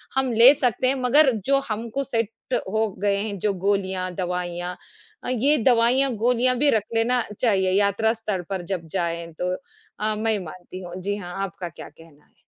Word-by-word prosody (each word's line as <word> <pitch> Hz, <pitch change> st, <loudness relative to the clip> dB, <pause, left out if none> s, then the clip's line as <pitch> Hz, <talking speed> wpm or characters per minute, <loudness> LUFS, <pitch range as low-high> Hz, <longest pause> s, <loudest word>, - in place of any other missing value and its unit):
हम 265 Hz, -2 st, +1 dB
ले 240 Hz, +5 st, +8 dB
सकते 255 Hz, -2 st, 0 dB
हैं, 270 Hz, -, +2 dB
मगर 265 Hz, +3 st, +5 dB
जो 275 Hz, 0 st, +3 dB
हमको 230 Hz, +5 st, -2 dB
सेट 230 Hz, -5 st, -1 dB, 0.4 s
हो 220 Hz, 0 st, +1 dB
गए 200 Hz, -1 st, +2 dB
हैं, 200 Hz, -1 st, -3 dB
जो 205 Hz, 0 st, +1 dB
गोलियाँ, 190 Hz, -2 st, 0 dB
दवाइयाँ 180 Hz, -1 st, -3 dB, 0.5 s
अ, -, -, -4 dB
ये 265 Hz, +5 st, +2 dB
दवाइयाँ, 245 Hz, +3 st, +3 dB
गोलियाँ 250 Hz, +3 st, +2 dB
भी 290 Hz, +3 st, +3 dB
रख 205 Hz, -, -3 dB
लेना 240 Hz, +2 st, +2 dB, 0.2 s
चाहिए, 190 Hz, -6 st, +2 dB
यात्रा 200 Hz, +3 st, +2 dB
स्तर 215 Hz, -5 st, -3 dB
पर 190 Hz, -2 st, -2 dB
जब 165 Hz, -3 st, -5 dB
जाएँ, 170 Hz, -1 st, -2 dB
तो 180 Hz, +3 st, -2 dB, 0.5 s
अ, 215 Hz, 0 st, 0 dB
मैं 220 Hz, +1 st, 0 dB
ये 210 Hz, -, 0 dB
मानती 185 Hz, +2 st, -9 dB
हूँ। 175 Hz, 0 st, -8 dB
जी 205 Hz, +2 st, -1 dB
हाँ, 180 Hz, -3 st, -7 dB
आपका 180 Hz, -2 st, -5 dB
क्या -, -, -9 dB
कहना 160 Hz, -3 st, -19 dB
है? -, -, -35 dB
210 Hz, 190 wpm, -24 LUFS, 185-245 Hz, 0.5 s, ले